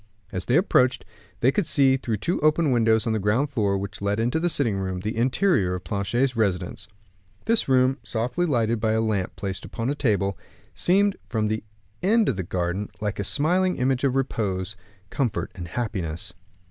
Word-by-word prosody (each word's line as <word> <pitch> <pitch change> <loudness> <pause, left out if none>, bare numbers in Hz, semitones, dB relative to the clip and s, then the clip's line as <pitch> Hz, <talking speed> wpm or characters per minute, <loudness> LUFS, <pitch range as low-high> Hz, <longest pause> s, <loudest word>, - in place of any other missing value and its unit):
As 90 -1 -4
they 125 - +3
approached, 130 -8 +3 0.4
they 130 - +5
could 195 +3 0
see, 135 -2 +4
through 115 -4 -2
two 170 - -1
open 155 -1 +3
windows 115 -2 +3
on 115 - 0
the 110 - 0
ground 115 +9 +1
floor, 100 -6 +1
which 100 +2 -6
led 100 +1 0
into 120 +7 +1
a 175 - +3
sitting 125 - +1
room, 95 -1 -3
the 105 +3 -3
interior 120 - +2
of 90 - -6
Planchet's 115 +8 0
residence. 95 -6 -1 0.6
This 225 -8 +2
room, 130 +1 +3
softly 125 +10 -1
lighted 115 -5 +1
by 110 0 +1
a 110 - +2
lamp 105 -4 -1
placed 95 -1 -5
on 115 0 -1
the - - +1
table, 100 - 0 0.3
seemed, 200 +2 +2
from 110 -2 0
the 110 0 -2 0.4
end 220 +3 +3
of 125 - 0
the 95 - -2
garden, 90 +3 -2
like 105 -1 -3
a - - 0
smiling 180 - +1
image 130 0 0
of 135 -2 +2
repose, 105 -7 -1 0.4
comfort, 125 -7 -1
and 90 -2 -7
happiness. 90 -5 -3
115 Hz, 185 wpm, -25 LUFS, 100-135 Hz, 0.6 s, they